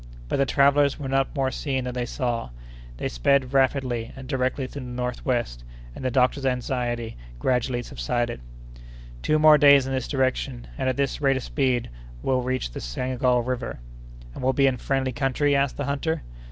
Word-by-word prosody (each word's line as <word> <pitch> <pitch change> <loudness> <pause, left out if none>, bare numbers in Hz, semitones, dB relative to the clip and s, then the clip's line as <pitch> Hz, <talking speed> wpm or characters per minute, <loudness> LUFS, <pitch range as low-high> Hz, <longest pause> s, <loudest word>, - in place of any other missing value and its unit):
But - - 0
the 140 0 +2
travellers 140 +1 +4
were 145 - -5
not 135 +3 0
more 135 -2 +1
seen 130 0 -2
than 125 0 -4
they 120 -1 -2
saw. 120 - -2 0.5
They - - -2
sped 130 - +1
rapidly 130 -4 +1
and 135 -1 -9
directly 130 0 -1
to - - -15
the 130 - -7
northwest, 125 - -2 0.3
and - - -8
the 130 - +1
doctor's 130 +2 +2
anxiety 120 - -2 0.2
gradually 125 - 0
subsided. 120 - -2 0.8
"Two 155 - +2
more 155 -1 +7
days 140 -2 +7
in 135 - -3
this 130 -2 -2
direction, 130 -2 -1
and 130 -1 -1
at 130 - -1
this 140 +1 -1
rate 135 -2 +3
of 130 - -4
speed, 130 -4 0
and - - -16
we'll 130 -1 +1
reach 130 - -2
the - - -6
Senegal 125 - 0
River." 125 -1 -3 0.6
"And - - -8
we'll 130 +1 +3
be 140 - +3
in 135 - +4
a - - -6
friendly 135 -1 0
country?" 140 +3 +1
asked 140 -1 +1
the 145 - -2
hunter. 145 +3 -1
130 Hz, 190 wpm, -25 LUFS, 125-135 Hz, 0.8 s, more